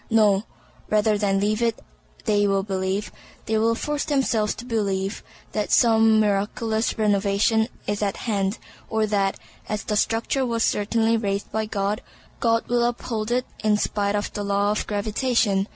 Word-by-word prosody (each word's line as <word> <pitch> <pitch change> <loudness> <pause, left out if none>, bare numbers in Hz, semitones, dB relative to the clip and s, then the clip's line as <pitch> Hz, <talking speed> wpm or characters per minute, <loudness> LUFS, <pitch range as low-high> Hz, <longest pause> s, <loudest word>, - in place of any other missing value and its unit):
No; 210 -2 +3 0.4
rather 215 0 +3
than 200 -1 +1
leave 210 +2 0
it 230 -1 +1 0.5
they 205 -1 +3
will 195 -1 +1
believe, 190 +1 -2 0.3
they 220 0 +1
will 230 +1 +2
force 295 +4 -2
themselves 260 -8 +1
to 240 - -9
believe, 200 -4 -1 0.3
that 210 -1 -2
some 225 -2 +5
miraculous 215 +2 0
renovation 210 +1 +2 0.2
is 205 0 -2
at 200 -2 -1
hand, 200 -3 0 0.3
or 220 -1 +1
that 200 -2 0 0.3
(as 210 -1 -2
the 210 - -2
structure 225 +5 +1
was 230 -2 0
certainly 225 +2 +2
raised 200 -2 -2
by 220 0 -1
God) 205 0 -1 0.4
God 230 -1 +1
will 240 0 +2
uphold 235 -2 -2
it 250 +1 +1 0.2
in 210 -1 +3
spite 205 -1 0
of 205 - -2
the 205 - -3
law 200 0 +1
of 210 - -2
gravitation. 210 -1 +1
215 Hz, 160 wpm, -24 LUFS, 200-225 Hz, 0.5 s, some